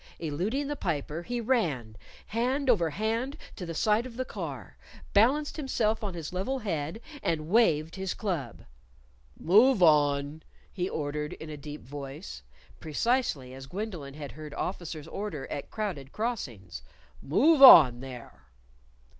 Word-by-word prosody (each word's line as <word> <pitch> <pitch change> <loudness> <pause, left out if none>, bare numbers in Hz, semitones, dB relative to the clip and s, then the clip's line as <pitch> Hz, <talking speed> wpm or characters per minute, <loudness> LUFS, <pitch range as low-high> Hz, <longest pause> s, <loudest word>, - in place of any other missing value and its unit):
Eluding 185 - -2
the 295 +1 -3
Piper, 160 - -3
he 240 +7 -3
ran, 165 - 0 0.3
hand 255 +4 +1
over 175 -8 +2
hand, 225 - -2 0.2
to 180 - -7
the 165 - -5
side 215 +7 +2
of 235 -2 -12
the 255 - -2
car, - - -7 0.4
balanced 270 +10 +3
himself 225 -7 0
on 195 -4 -3
his 165 0 -6
level 195 +9 -1
head, 170 - -3 0.2
and 155 -1 -2
waved 165 -8 +3
his 190 -1 -3
club. 165 - -4 0.8
"Move 215 +4 +5
on!" 145 -1 +3 0.3
he 180 -1 -2
ordered 150 0 -3
in 160 -1 -9
a - - -5
deep 150 +1 -8
voice 135 - -8 0.4
(precisely 155 - -1
as 135 0 -10
Gwendolyn 175 -6 -6
had 145 -2 -7
heard 150 -1 -9
officers 165 -4 -5
order 165 -8 -5
at 140 - -5
crowded 175 -11 -4
crossings); 120 - -4 0.4
"move 275 - +3
on, 145 - +10
there!" 125 - -10
170 Hz, 140 wpm, -28 LUFS, 145-225 Hz, 0.8 s, on